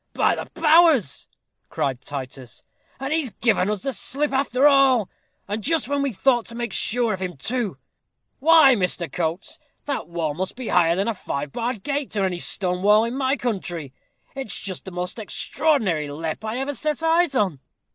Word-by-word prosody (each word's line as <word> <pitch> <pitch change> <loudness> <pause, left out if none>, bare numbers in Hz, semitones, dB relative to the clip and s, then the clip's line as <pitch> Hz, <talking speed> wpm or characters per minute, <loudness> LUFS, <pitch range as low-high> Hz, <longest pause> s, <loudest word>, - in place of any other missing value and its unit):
"By - - +3
the - - -5
powers!" 315 - +4 0.4
cried 130 -2 -2
Titus, 130 -3 -7 0.4
"and 270 +3 -2
he's 315 -5 +1
given 210 -5 +1
us 210 -3 -2
the 270 - -2
slip 275 +7 -1
after 270 0 +3
all. 270 -7 +4 0.4
And 205 +2 -3
just 320 +6 +1
when 285 0 0
we 280 -1 0
thought 240 +2 +1
to 230 - -7
make 235 0 -4
sure 235 -1 +1
of 190 - -4
him, 180 -4 -4
too. 220 - -2 0.6
Why, 315 -3 +7
Mr. 180 - -1
Coates, 170 +2 -3 0.3
that 285 -1 -3
wall 170 -3 -2
must 185 +5 -4
be 250 -2 -5
higher 170 -1 +4
than 195 +4 0
a 230 - +1
five 145 -7 -5
barred 235 - -3
gate, 280 -5 -2
or 195 - +2
any 180 -2 -2
stone 180 0 -1
wall 210 +2 +5
in 235 +2 -4
my 265 -1 +1
own - - 0
country. 175 - -4 0.4
It's 270 -6 -4
just 185 -2 -6
the 190 - -7
most 180 +4 -4
extraordinary 215 - 0
lepp 155 +5 -5
I 220 +2 -3
ever 270 +2 -2
set 305 +2 -2
eyes 325 -2 +3
on!" 190 - +1
220 Hz, 185 wpm, -23 LUFS, 180-270 Hz, 0.6 s, Why